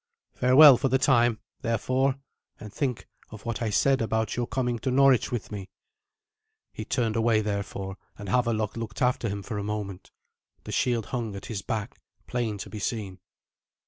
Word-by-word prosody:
Farewell 130 +2 +8
for 135 - 0
the 130 - +3
time, 120 -4 +3 0.2
therefore, 130 +3 +1 0.4
and 105 -2 -10
think 130 -3 -2 0.2
of 110 -2 -11
what 115 -1 -3
I 115 - 0
said 135 +5 +2
about 110 0 -1
your 120 -1 -1
coming 125 -2 -1
to 130 - -2
Norwich 135 -1 +4
with 120 -3 -4
me." 100 -2 -6 1.0
He - - -5
turned 115 -4 -1
away 115 -1 +3
therefore, 100 -2 -4 0.2
and 100 - -8
Havelok 110 -1 0
looked 115 -3 -6
after 125 -2 +1
him 100 0 -4
for 105 -1 -4
a - - -3
moment. 100 -3 -5 0.5
The - - -7
shield 120 -4 +1
hung 115 -5 -2
at 100 - -8
his 105 -4 -4
back, 110 +3 -4 0.3
plain 120 -4 -2
to 100 - -7
be 105 - -6
seen. 100 -3 -4
115 Hz, 175 wpm, -27 LUFS, 105-125 Hz, 1.0 s, Farewell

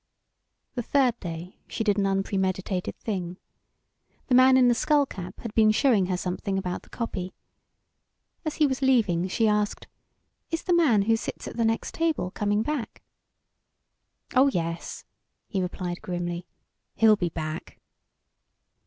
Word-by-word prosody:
The 245 - -2
third 250 -1 +2
day 170 0 -7
she 225 - -3
did 205 -2 +2
an 195 - +2
unpremeditated 190 -1 -1
thing. 180 -4 -4 0.9
The - - +2
man 260 +1 +7
in 255 -1 +6
the 240 - +5
skull 290 +4 +3
cap 185 -8 -8
had 230 -3 -6
been 220 -1 +5
showing 215 -4 +3
her 185 -1 0
something 185 +2 -2
about 180 -2 -3
the - - -21
copy. 190 -6 -4 1.1
As 310 -2 -3
he 305 - +3
was 265 -1 -1
leaving, 215 -10 +3
she 220 +4 +1
asked: 210 -1 0 0.6
"Is 330 0 -3
the 360 - +1
man 275 -13 +4
who 225 +2 +3
sits 225 - -5
at - - -7
the 230 -1 +1
next 225 0 -1
table 320 - 0
coming 205 +1 0
back?" 285 -3 -4 1.3
"Oh 265 +2 +6
yes," 170 -8 -3 0.4
he 195 - -1
replied 180 -1 -4
grimly, 175 0 -4 0.5
"he'll 220 -1 +6
be 180 -4 -1
back." 155 -1 -6
205 Hz, 150 wpm, -26 LUFS, 180-250 Hz, 1.3 s, man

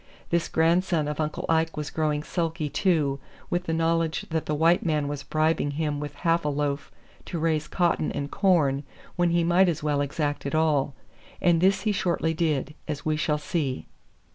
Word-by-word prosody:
This 170 -1 +1
grandson 165 -1 +2
of 150 0 -4
Uncle 155 -1 -2
Ike 160 -1 +1
was 150 -1 -4
growing 150 -2 0
sulky, 165 -3 -2
too, 150 -3 +1 0.3
with 175 +1 0
the 165 - -2
knowledge 165 0 +1
that 160 -1 -1
the 150 - 0
white 165 +3 +3
man 150 -3 0
was 145 -1 -4
bribing 155 0 +1
him 150 -2 -1
with 145 0 -6
half 170 0 +3
a 150 - 0
loaf 145 0 -2 0.3
to 175 - -4
raise 155 -2 0
cotton 170 -3 +1
and 140 0 -4
corn 165 -9 +2 0.3
when 175 -1 +2
he 170 0 +2
might 175 +2 +4
as 160 -3 -3
well 145 -1 +1
exact 145 +1 -2
it 140 - -2
all. 150 -4 +2 0.4
And 170 -2 +3
this 190 +1 +3
he 210 +1 +1
shortly 170 -4 0
did, 155 -4 -1
as 150 -2 -4
we 155 -1 +1
shall 150 0 0
see. 145 -3 -2
155 Hz, 190 wpm, -26 LUFS, 150-170 Hz, 0.4 s, might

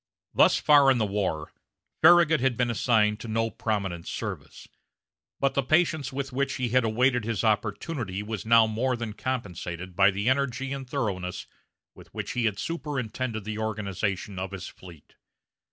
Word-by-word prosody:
Thus - - +5
far 145 -2 +5
in 130 - +4
the 110 - +1
war, 95 -7 -2 0.5
Farragut 165 -1 +6
had 130 -2 +1
been 125 -1 +1
assigned 105 -2 +2
to - - -8
no 115 +1 -1
prominent 95 -6 -3
service, - - -6 0.7
but 135 0 +1
the 140 - +1
patience 155 -1 +1
with 135 0 -4
which 140 +2 -1
he 125 -2 -2
had 130 +2 +3
awaited 120 +2 +2
his 115 -1 -2
opportunity 105 - -1
was 110 -2 -5
now 115 0 +6
more 120 +4 -1
than 115 -2 -5
compensated 90 -8 -5
by 100 +1 +6
the 100 +3 -2
energy 135 0 0
and 135 -2 -7
thoroughness 95 -10 -3 0.5
with - - -16
which - - -4
he 115 -3 +1
superintended 130 -7 -4
the 105 +1 -5
organization 100 -2 -3
of 95 +1 -5
his 95 -2 -6
fleet. 85 -5 -15
115 Hz, 160 wpm, -27 LUFS, 100-130 Hz, 0.7 s, Farragut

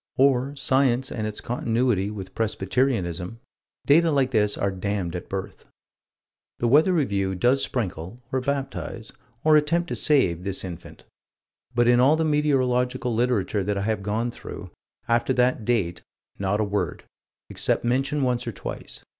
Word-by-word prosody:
Or 135 +1 +3
Science 130 -2 +1
and 110 -2 -3
its 105 - -6
continuity 115 -4 0
with 95 -3 -7
Presbyterianism 105 -3 -1 0.5
data 165 +4 +5
like 135 -4 +2
this 105 -3 +2
are 100 - 0
damned 95 -2 -3
at 90 - -6
birth. 95 -1 -6 0.9
The 120 - 0
Weather 150 +9 +5
Review 100 - 0
does 125 +8 +2
sprinkle, 95 -4 -3
or 130 - 0
baptize, 135 -5 -4 0.3
or 155 0 +5
attempt 165 +4 +2
to - - -2
save, 95 - +2
this 95 -1 -2
infant 90 -4 -9 0.7
but 120 0 +3
in 120 0 +5
all 135 +5 +5
the 160 0 0
meteorological 130 -4 +1
literature 110 -4 +1
that 100 +1 -1
I 100 - -1
have 110 -1 -1
gone 110 +4 -1
through, - - -9 0.4
after 120 +2 +2
that 125 -3 +1
date 100 -8 0 0.4
not 100 +1 0
a - - +2
word, 100 -5 -2 0.5
except - - 0
mention 135 +4 +1
once 125 -1 0
or - - -1
twice. - - -7
120 Hz, 155 wpm, -25 LUFS, 100-135 Hz, 0.9 s, data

